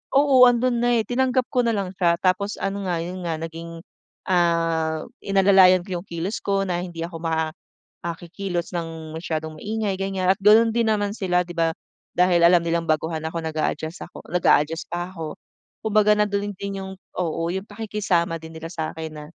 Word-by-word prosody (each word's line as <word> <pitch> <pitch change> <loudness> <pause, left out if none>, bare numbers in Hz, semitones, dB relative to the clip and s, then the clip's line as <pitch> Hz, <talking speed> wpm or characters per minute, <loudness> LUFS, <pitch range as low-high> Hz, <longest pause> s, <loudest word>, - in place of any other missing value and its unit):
oo 280 -1 +5
andun 240 0 +1
na 240 0 +3
eh, - - -4
tinanggap 255 0 +1
ko 250 -1 +2
na 230 - +2
lang 195 -3 -2
siya 170 -2 +3
tapos 190 +2 +1
ano 195 0 -2
nga 170 -1 0
'yun 180 +2 -5
nga 165 -2 -1
naging, 165 0 -7 0.5
ah, 165 -3 +1 0.2
inalalayan 195 -2 +5
ko 180 -3 -4
yung 190 - -19
kilos 170 +6 -3
ko 195 -1 +1
na 175 -1 -1
hindi 170 -2 -7
ako 170 -1 -8
ma 160 -1 0 0.5
ah, 170 -1 -2
kikilos 175 0 -4
ng 165 -2 -5
masyadong 160 -2 -4
maingay 215 -1 -1
ganyan 190 -1 +1
at - - -20
ganun 220 +3 +6
din 230 -1 +1
naman 205 -2 +1
sila 180 -3 +1
'di 175 - -8
ba 165 0 +3 0.5
dahil 180 -1 +4
alam 175 0 +5
nilang 170 0 0
baguhan 155 +1 0
ako 165 +1 -3
nag-aadjust 155 +1 -3
ako - - -12
nag-aadjust 165 -2 +2
pa 175 +1 -3
ako. 160 -4 -6 0.5
Kumbaga 210 0 +4
nandun 205 -1 0
din 200 -1 -4
'yung 190 - -7 0.3
oo 165 -2 -1
'yung 190 +2 -4
pakikisama 195 -6 -1
din 160 0 -10
nila 160 +1 -7
sa'kin 160 -1 -5
na, 150 - -8
180 Hz, 185 wpm, -23 LUFS, 165-200 Hz, 0.5 s, ganun